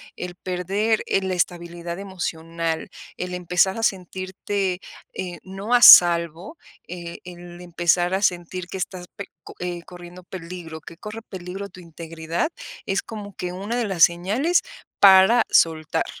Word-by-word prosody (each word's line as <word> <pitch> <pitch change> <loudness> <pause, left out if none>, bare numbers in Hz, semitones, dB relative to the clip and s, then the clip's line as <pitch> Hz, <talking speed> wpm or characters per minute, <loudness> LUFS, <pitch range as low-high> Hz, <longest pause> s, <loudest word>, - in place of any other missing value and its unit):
el 180 0 -7
perder, 195 +5 -1
eh, 195 - +1
la 190 -1 -2
estabilidad 175 -1 -3
emocional, 165 -4 -4 0.3
el 180 0 -5
empezar 180 +3 +1
a - - -4
sentirte, 190 0 -2 0.4
eh, 180 -2 -5
no 195 +5 -5
a 245 - +5
salvo, 170 - +7 0.3
eh, 170 -1 -7
el 175 -1 -11
empezar 175 +1 +1
a 190 - 0
sentir 180 -1 -1
que 190 - -6
estás 180 -1 -5
pe 200 - -6 0.2
co - - -12
eh, 175 -1 -4
corriendo 175 +1 -12
peligro, 170 -3 -8
que 165 - -12
corre 215 +4 -8
peligro 190 0 -7
tu 185 - -14
integridad, 165 - -4 0.4
es 195 0 0
como 205 -2 -9
que 180 0 -4
una 200 +6 -4
de 245 -1 0
las 190 -5 +2
señales 210 - +3 0.4
para 195 +4 +7
soltar. 160 -2 +2
180 Hz, 150 wpm, -23 LUFS, 175-195 Hz, 0.4 s, salvo